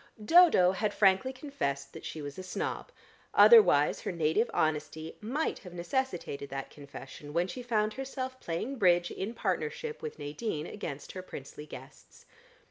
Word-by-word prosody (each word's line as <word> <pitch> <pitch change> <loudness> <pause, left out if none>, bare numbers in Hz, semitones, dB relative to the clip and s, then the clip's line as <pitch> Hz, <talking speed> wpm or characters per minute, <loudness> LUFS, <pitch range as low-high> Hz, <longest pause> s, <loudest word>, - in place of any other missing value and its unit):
Dodo 325 - +7
had 205 +2 -1
frankly 195 +6 +4
confessed 140 - -4
that 160 - -9
she 155 - -6
was 145 +4 -7
a - - -4
snob; 185 - -4 0.4
otherwise 420 - +7
her - - -3
native 170 +7 +1
honesty 155 +1 -1
might 265 +9 -2
have 180 -2 -11
necessitated 175 - -3
that 135 0 -5
confession 145 0 -10
when 170 +2 +1
she 190 +7 -6
found 215 -3 0
herself 260 0 -5
playing 225 +11 -3
Bridge 175 -4 +3
in 215 +5 -4
partnership 460 - -2
with 460 -1 -6
Nadine 150 +2 -4
against 155 -8 -6
her 185 - -6
princely 150 -3 -9
guests. - - -13
185 Hz, 150 wpm, -30 LUFS, 155-255 Hz, 0.4 s, Dodo